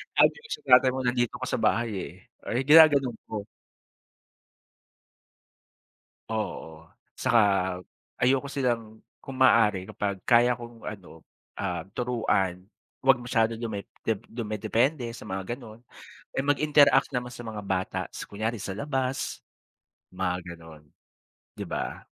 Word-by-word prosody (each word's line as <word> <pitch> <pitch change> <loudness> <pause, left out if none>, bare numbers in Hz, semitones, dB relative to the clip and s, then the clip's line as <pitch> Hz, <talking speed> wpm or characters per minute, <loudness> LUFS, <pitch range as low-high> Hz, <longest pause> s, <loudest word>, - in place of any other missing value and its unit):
Sabi - - +5
ko 465 - -15
sa - - -7 0.2
tatay 130 0 +1
mo 130 - -3
nandito 120 -1 0
ka - - -2
sa - - -1
bahay 115 0 +2
eh, - - -6 0.4
ay 125 +3 0
ginaganon 145 -4 +6
ko. 105 -2 -5 2.9
Oo, 85 -7 -4 0.3
tsaka 120 -2 +3 0.8
ayoko 135 +2 +2
silang 115 -5 -2 0.2
kung 135 -1 -8
maaari 105 -7 +4
kapag 100 -2 -3
kaya 120 0 +4
kong 120 -1 -11
ano, 95 -6 -9 0.3
ah, 90 -2 -3
turuan 100 -7 -1 0.3
'wag 135 -1 +4
masyado 115 -2 +1
dume 110 -3 -5 0.2
dep 110 -3 0
dumedepende 120 +4 -1
sa - - -10
mga 95 +4 -4
ganon. 115 -3 -13 0.5
Eh, - - -6
mag-interact 145 -2 +4
naman 125 -1 -4
sa 120 - -8
mga 110 -3 -6
bata, 95 -1 -2
tas - - -9
kunyari 110 +1 -4
sa - - -5
labas 135 -1 -2 0.7
mga 90 -1 -1 0.2
ganon, 80 -2 -14 0.7
di - - -5
ba? - - -5
115 Hz, 125 wpm, -27 LUFS, 100-130 Hz, 2.9 s, ginaganon